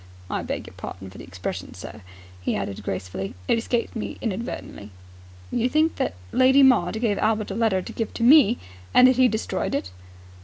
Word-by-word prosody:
"I - - -1
beg - - -4
your - - -12
pardon 95 0 -8
for 95 - -12
the - - -8
expression, 90 +1 -6
sir," 95 - -9 0.4
he - - -1
added 100 -1 -4
gracefully. 95 0 -5
"It 230 - +3
escaped 235 +1 -2
me 220 - -5
inadvertently." 205 - -5 0.6
"You 240 +1 +1
think 310 +4 +2
that - - -1 0.2
Lady 265 +2 +5
Maud 220 -6 +4
gave 220 -3 0
Albert 215 -1 0
a - - -4
letter 215 -5 +1
to - - -8
give 225 - -3
to 230 - -2
me, 245 -3 +7 0.4
and 250 0 +8
that 255 -1 +3
he 255 -1 +6
destroyed 215 - -2
it?" 95 -10 -3
220 Hz, 190 wpm, -24 LUFS, -, 0.6 s, and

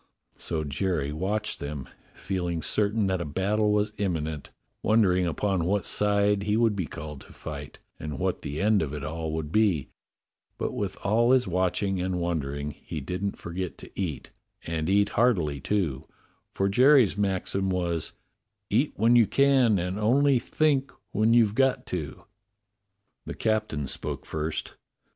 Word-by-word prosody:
So 80 -2 -3
Jerry 75 -1 -1
watched 105 +6 -1
them, 70 -3 -5 0.3
feeling 90 -4 -3
certain 105 0 +1
that 95 -2 0
a - - -1
battle 100 +7 +1
was 105 0 +1
imminent, 80 -6 -2 0.3
won 110 +1 +4
dering 90 -2 +2
upon 90 +1 0
what 100 0 0
side 105 0 +2
he 105 +2 +1
would 115 -2 +3
be 90 -5 -2
called 75 -1 -8
to - - -15
fight, 70 -2 -8 0.2
and 75 -2 -5
what - - -1
the 70 +2 -4
end 105 0 +3
of 75 -3 -3
it 75 - -6
all 80 +1 -3
would 80 -2 -3
be; 95 -8 +2 0.7
but - - -2
with - - -3
all 115 +5 +3
his 125 -4 +3
watching 95 +1 0
and 90 0 -1
wondering 75 -4 -2
he 75 - -7
didn't 90 +8 -3
forget 90 +1 -5
to - - -11
eat, 85 -8 -4 0.3
and 80 0 -2
eat 100 +1 +3
heartily, 90 - +2
too, 80 -5 -1 0.4
for 95 - 0
Jerry's 125 0 +5
maxim 95 -1 0
was, 85 -3 -1 0.6
"Eat 125 +8 +2
when 115 +3 +4
you 115 -3 +6
can, 135 -6 +4
and 90 +3 -2
only 130 +4 +4
think 140 0 +1 0.2
when 110 +3 +3
you've 110 -4 +4
got 135 +1 +2
to." 80 -6 -4 1.0
The - - -5
captain 110 -10 -1
spoke - - -3
first. 80 0 -3
95 Hz, 155 wpm, -27 LUFS, 80-105 Hz, 1.0 s, you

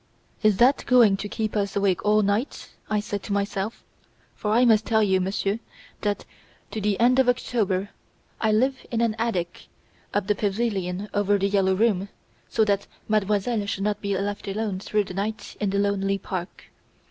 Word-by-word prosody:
"Is 215 -3 +3
that 255 +5 +4
going 235 -5 +6
to 205 +1 -5
keep 215 0 -3
us 200 -2 -1
awake 195 -3 +1
all 210 0 +4
night?" 205 +7 -1 0.2
I 215 -1 +1
said 205 -1 -4
to 200 - -4
myself; 200 +1 -2 0.5
for 210 - -4
I 235 +4 +4
must 220 -2 +5
tell 220 -1 +2
you, 190 -2 +2
Monsieur, 195 +3 -1 0.4
that, 205 -1 -1 0.5
to 220 - -4
the 205 -1 0
end 250 +2 +4
of 260 -2 +4
October, 205 -6 0 0.5
I 220 - +2
live 260 +5 +1
in 230 - -1
an 230 -2 +1
attic 180 -7 -2 0.4
of 205 -1 0
the 210 - +2
pavilion 200 -2 -1
over 205 0 +2
"The 195 0 +1
Yellow 190 -1 +2
Room", 200 -2 +1 0.4
so 220 - +2
that 200 -1 0 0.2
Mademoiselle 210 +1 +1
should 195 -1 -2
not 210 0 -1
be 200 -1 -1
left 205 +1 -3
alone 200 -1 -2
through 210 +1 0
the 185 - -8
night 210 +3 -4
in 205 - 0
the 200 - -1
lonely 200 -1 +1
park. 185 -1 -6
205 Hz, 180 wpm, -25 LUFS, 195-220 Hz, 0.5 s, going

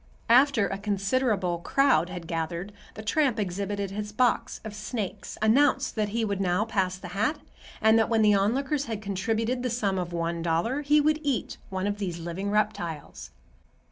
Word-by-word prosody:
After 250 -3 +5
a 195 +2 -4
considerable 200 -2 0
crowd 255 - +3
had 180 -2 -7
gathered, 170 +4 -3 0.2
the 215 - -7
tramp 255 +1 +1
exhibited 200 +1 -2
his 210 +1 -4
box 240 +1 +1
of 215 - -6
snakes, 210 -1 -5
announced 265 +3 +3
that 215 -2 0
he 225 +2 0
would 200 -2 -2
now 185 +3 +1
pass 190 -5 -1
the 185 -1 -9
hat, 210 - 0 0.4
and 220 +1 +5
that 225 - +2
when 225 -1 +3
the 210 -1 +5
onlookers 265 +8 +1
had 225 -4 -4
contributed 220 +5 -1
the 250 - -1
sum 205 -5 0
of 175 -1 -4
one 170 0 -2
dollar, 170 - 0
he 295 +1 +4
would 305 +1 +2
eat 280 -6 -2
"one 190 0 -2
of 205 0 -2
these 180 -4 -3
living 175 +4 -4
reptiles." 200 -8 -2
210 Hz, 175 wpm, -27 LUFS, 185-235 Hz, 0.4 s, After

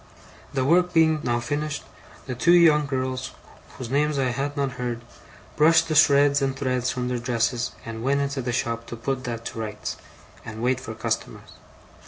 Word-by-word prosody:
The 130 -2 0
work 180 +4 +3
being 160 -1 +4
now 120 -3 0
finished, 145 +4 -3 0.4
the 130 - -4
two 170 +4 +5
girls, 130 -1 -3 0.4
whose 125 -2 -6
names 150 +1 +1
I 130 -2 +1
had 140 +3 -3
not 140 -1 0
heard, 120 -1 -3 0.5
brushed 160 +2 +4
the - - +1
shreds 145 -1 +5
and 135 -1 0
threads 125 -2 -1
from 125 0 -2
their 125 -1 -2
dresses, 120 0 -1
and 115 0 -6
went 140 +3 +1
into 140 -1 -2
the 120 0 -2
shop 115 -1 -2
to - - -6
put 130 +3 -3
that 115 -1 -5
to - - -5
rights, 105 -1 -5 0.5
and 110 +1 -7
wait 130 +1 +1
for 115 -3 -7
customers. - - -4
130 Hz, 180 wpm, -24 LUFS, 120-145 Hz, 0.5 s, two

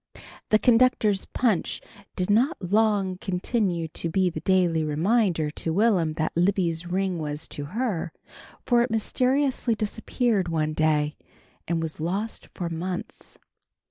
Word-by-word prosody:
The 215 - +6
conductor's 225 -4 +3
punch 225 -9 0 0.4
did 185 +1 0
not 255 +10 +2
long 200 -1 +1
continue 180 -2 -1
to 165 - -3
be 185 +1 +1
the - - -5
daily 175 -4 +2
reminder 165 0 +1
to 165 - -3
Will'm 180 -4 +2
that 155 0 -2
Libby's 175 -2 +1
ring 185 0 -1
was 150 0 -4
to 145 - -5
her, 195 - -2 0.5
for 240 -1 +4
it 240 - +1
mysteriously 255 +2 +1
disappeared 215 -1 -1
one 155 -2 -1
day, 150 -1 +1 0.5
and 165 -1 0
was 160 -1 -5
lost 195 +7 -3
for 175 - -3
months. 175 +2 -5
185 Hz, 135 wpm, -25 LUFS, 165-220 Hz, 0.5 s, The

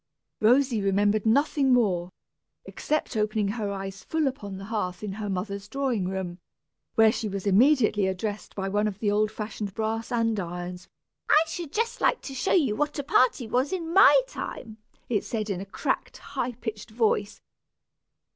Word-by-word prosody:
Rosy 245 0 +3
remembered 205 +2 +2
nothing 280 +3 +3
more, 185 -8 +2 0.5
except 305 -4 -2
opening 215 -1 0
her 210 -1 -2
eyes 195 -1 -6
full 320 -1 0
upon 205 -8 -4
the 195 - -8
hearth 195 -4 -3
in 210 - -3
her 205 +1 -5
mother's 200 +1 -4
drawing 245 -5 -1
room, 190 -2 -4 0.6
where 220 -1 +6
she 215 -1 -3
was 195 0 -5
immediately 215 -1 +4
addressed 205 +3 -4
by 195 -1 -2
one 205 +2 +1
of 200 -2 -4
the 210 -1 0
old 210 +1 +2
fashioned 210 -2 -5
brass 225 0 -2
andirons. 180 -6 -2 0.4
"I - - +7
should 325 -2 -6
just 460 +5 -1
like - - +2
to 270 - -7
show 265 +8 -1
you 280 - +3
what 295 +5 -1
a 285 - -2
party 255 -2 +3
was 255 +5 0
in 335 -3 -3
my 395 +6 +8
time," 225 - -7 0.3
it 215 -4 0
said, 215 -2 -3
in 185 -1 -3
a - - -6
cracked, - - -2
high 245 +1 -4
pitched 225 -2 -6
voice. 215 -2 0
215 Hz, 170 wpm, -26 LUFS, 200-255 Hz, 0.6 s, my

